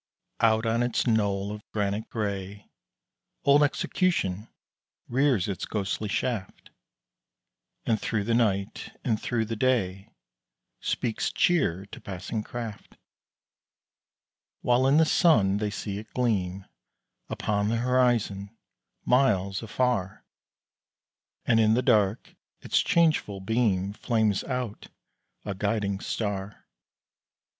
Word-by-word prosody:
Out 110 0 +3
on 115 +1 +1
its 120 -1 0
knoll 100 -4 +1
of 105 0 -7
granite 105 +1 -2
gray, 100 -2 -4 0.7
Old 140 +1 +5
Execution 140 - 0 0.6
rears 130 -6 +2
its 100 -3 -3
ghostly 105 0 -2
shaft, 110 -3 -3 1.1
And 110 -2 +1
thro' 110 -3 -1
the 115 +3 0
night 100 -4 -1
and 110 -2 0
thro' 120 -2 0
the 115 +1 -4
day 105 -6 0 0.7
Speaks 115 -3 -1
cheer 100 - +1
to - - -9
passing 95 +3 -4
craft; 115 -2 -7 1.6
While 125 +2 +3
in 140 +2 +4
the 160 - +6
sun 105 - +4
they 105 0 -1
see 100 -1 -4
it 110 - -12
gleam 100 -6 0 0.6
Upon 105 -1 -1
the 115 - +1
horizon, 115 -4 +1 0.5
miles 100 -7 +2
afar, 115 -4 -1 1.2
And 115 - +4
in 110 0 +4
the 125 - +1
dark 110 -3 +2 0.3
its - - +2
changeful 155 -12 +2
beam 100 -2 0
Flames 110 -3 0
out 125 -5 -4 0.6
a 100 - -2
guiding 100 0 -1
star. 100 -2 -4
110 Hz, 110 wpm, -27 LUFS, 100-120 Hz, 1.6 s, the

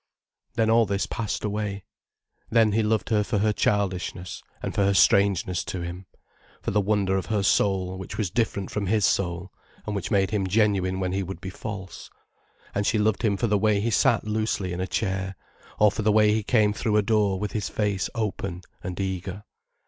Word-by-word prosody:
Then 110 -2 +2
all 115 -1 +4
this 100 0 0
passed 115 -3 -3
away. 105 -2 -3 0.7
Then 115 -2 +4
he 110 +2 +2
loved 110 0 0
her 105 -2 +3
for 105 +1 -1
her 105 +1 +2
childishness 95 -3 -1 0.2
and - - -3
for 100 - +1
her 100 0 +2
strangeness 95 -2 +3
to 90 - -4
him, 90 +2 -6 0.5
for - - -3
the 105 - +2
wonder 100 -1 +1
of 95 - -3
her 105 -3 0
soul 95 0 +1
which 95 - -7
was 100 -5 -1
different 105 -5 -1
from 105 -2 -2
his 105 +1 +2
soul, 90 0 0 0.3
and 105 - -3
which 100 - -3
made 100 -3 +2
him 100 -3 0
genuine 95 -2 +2
when 90 -1 -1
he 95 +1 -1
would 95 -2 -6
be 95 +1 -6
false. 95 -3 -7 0.6
And 100 0 0
she 110 - +2
loved 105 -1 +1
him 100 -3 +1
for 120 - 0
the 105 -2 +2
way 105 0 +3
he 115 +3 0
sat 120 +1 +3
loosely 105 -4 -1
in 90 - -3
a 95 - -2
chair, 95 -2 -2 0.4
or 105 -1 +5
for 110 - -3
the 105 0 +3
way 105 0 +5
he 110 - +1
came 105 -1 +2
through 110 -1 0
a 105 - +3
door 105 -2 +2
with 105 +1 -3
his 105 -4 -2
face 105 -3 -1
open 100 -5 -3 0.2
and 90 0 -6
eager. 95 +1 -3
100 Hz, 205 wpm, -25 LUFS, 95-105 Hz, 0.7 s, or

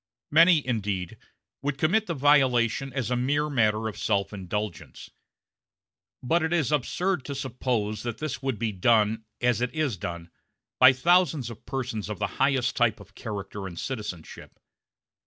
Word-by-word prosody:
Many, 165 -1 +6
indeed, 100 -7 -2 0.5
would 140 0 -2
commit 190 +10 +2
the 170 - -2
violation 135 -2 +3
as 125 -3 -3
a - - +2
mere 145 +4 0
matter 110 -4 +1
of 110 - -6
self 100 -1 0
indulgence; 95 -6 -5 1.1
but 165 +7 +2
it 160 +1 -1
is 160 -5 +1
absurd 165 +4 0
to 140 - -5
suppose 125 -5 -2
that 120 -2 -4
this 155 -5 -4
would 135 -4 -2
be 110 0 -1
done, 110 +2 +2 0.2
as 120 -1 +2
it 125 - 0
is 150 -10 0
done, 85 0 -6 0.5
by 130 0 +9
thousands 155 -2 +2
of 110 - -13
persons 125 -5 -4
of 105 - -4
the - - -1 0.2
highest 130 -2 +2
type 115 -3 +2
of 100 0 -15
character 100 -3 -6
and 85 -2 -9
citizenship. 105 -10 -7
120 Hz, 155 wpm, -26 LUFS, 105-140 Hz, 1.1 s, by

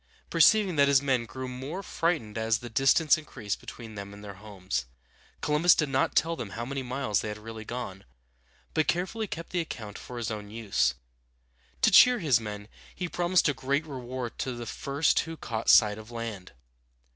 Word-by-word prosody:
Perceiving 205 -7 +5
that 140 0 +5
his 140 -1 +5
men 130 -4 0
grew 130 +2 -6
more 135 +9 -6
frightened 160 - -1
as 110 0 +1
the 120 0 -9
distance 135 +6 +4
increased 115 -9 -5
between 115 -2 -10
them 100 -1 -8
and 105 - -12
their 100 -1 -7
homes, 95 - -4 0.5
Columbus 150 +4 +4
did 150 -3 0
not 135 0 +1
tell 165 +1 +2
them 115 - -6
how 120 - -3
many 135 +1 -3
miles 125 -5 -1
they - - -4
had 105 0 -4
really 110 0 -9
gone, 110 -6 -6 0.7
but 155 -1 +1
carefully 190 +5 -1
kept 165 -2 -7
the 180 - 0
account 110 -10 -6
for 125 - -9
his 115 -1 -3
own 105 -1 -6
use. 105 -10 0 0.9
To - - +6
cheer 250 0 +8
his 145 - +3
men, 105 -2 -7 0.3
he 180 - -3
promised 175 +1 +2
a 145 - +2
great 140 +4 -1
reward 125 -4 -6
to 130 - -2
the 120 -1 -6
first 140 +6 +1
who 165 0 -4
caught 115 -5 -3
sight 105 -1 +6
of 110 +1 -12
land. 115 - -6
125 Hz, 190 wpm, -28 LUFS, 110-150 Hz, 0.9 s, cheer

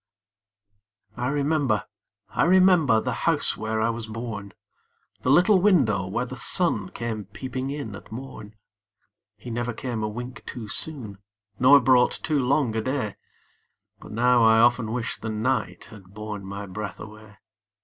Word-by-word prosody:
I 125 0 -2
remember, 140 -5 +1 0.4
I - - +1
remember, 180 -9 +5
The - - -2 0.2
house - - +3
where 110 0 -2
I 110 +1 +2
was 115 -1 -6
born, 110 -3 -6 0.7
The - - -1
little 180 +7 +5
window 125 - +3
where 120 +6 -2
the 130 +1 -8
sun 120 - 0
Came 110 -3 -5
peeping 130 +6 -5
in 140 -8 -5
at 100 - -13
morn; 110 -3 -9 0.8
He 115 +4 -9
never 120 +1 -2
came 120 -1 -4
a 110 - -1
wink 120 +4 -7
too 115 -3 -6
soon, 110 -4 -5 0.4
Nor 140 +3 +7
brought 125 -1 +3
too 150 -4 +1
long 125 -3 +1
a 110 - 0
day, 130 -4 -2 0.8
But - - -12
now, 120 +2 +3
I 110 0 +6
often 120 -1 +3
wish 120 0 -3
the 110 - -5
night 110 +2 -2
Had 100 -3 -15
borne 105 -2 -6
my 100 +1 -6
breath 100 -1 -6
away! 110 -1 -12
115 Hz, 155 wpm, -25 LUFS, 110-130 Hz, 0.8 s, Nor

